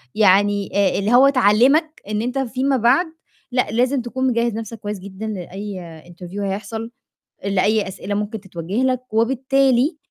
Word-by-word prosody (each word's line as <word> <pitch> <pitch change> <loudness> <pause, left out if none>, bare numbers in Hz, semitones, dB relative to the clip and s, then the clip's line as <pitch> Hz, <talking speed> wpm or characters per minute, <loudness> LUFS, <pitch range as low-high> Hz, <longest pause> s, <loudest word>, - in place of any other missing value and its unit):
يعني 205 -1 +3
آآ، 200 -1 +2
اللي 210 +4 0
هو 265 +3 +7
تعلِّمك 275 +6 +3
إن 210 0 -1
أنت 250 +3 -2
فيما 265 +1 0
بعد 250 +10 +3 0.5
لأ، 250 0 +1
لازم 250 +3 +1
تكون 260 +2 -2
مجهّز 235 -2 +1
نَفْسك 225 0 -6
كويس 205 -1 -5
جدًا 200 +3 -7
لأي 185 -4 -7
interview 175 +3 -9
هيحصل، 210 +3 -4 0.5
لأي 200 +2 +1
أسئلة 200 +2 -5
ممكن 210 +1 -3
تتوجه 190 +5 -3
لك، 255 -2 -1
وبالتالي 265 +4 +2
220 Hz, 150 wpm, -20 LUFS, 200-255 Hz, 0.5 s, هو